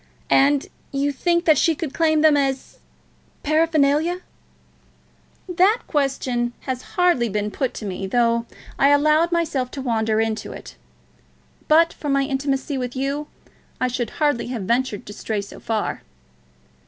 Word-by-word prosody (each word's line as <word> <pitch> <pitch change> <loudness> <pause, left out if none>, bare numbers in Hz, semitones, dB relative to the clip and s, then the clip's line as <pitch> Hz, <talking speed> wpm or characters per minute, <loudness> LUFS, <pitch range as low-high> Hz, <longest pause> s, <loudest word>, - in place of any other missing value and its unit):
"And 280 +1 +4 0.3
you 280 +1 0
think 340 +5 0
that 310 -4 +5
she 330 - +3
could 295 -3 -5
claim 315 -2 +2
them 310 -1 +5
as 270 -2 -2 0.6
paraphernalia?" 310 +2 +2 1.3
"That 375 +6 +3
question 260 -4 -1
has 255 -2 -4 0.2
hardly 350 -10 +3
been 210 +1 -2
put 260 +5 -2
to 215 - -6
me, 195 0 -4
though 235 +2 +1 0.3
I 275 - +5
allowed 305 +4 +3
myself 305 -7 0
to - - -3
wander 220 -3 0
into 225 0 -2
it. - - -10 0.9
But 330 +2 +5
for 295 - -6
my 275 0 +2
intimacy 270 0 -2
with 250 0 -4
you, 280 +3 -2 0.5
I 255 - +1
should 240 -2 -2
hardly 290 -6 +1
have 240 -5 -4
ventured 235 +1 -1
to 205 - -9
stray 215 0 -3
so 200 - -8
far." 220 -2 -2
275 Hz, 145 wpm, -22 LUFS, 240-310 Hz, 1.3 s, that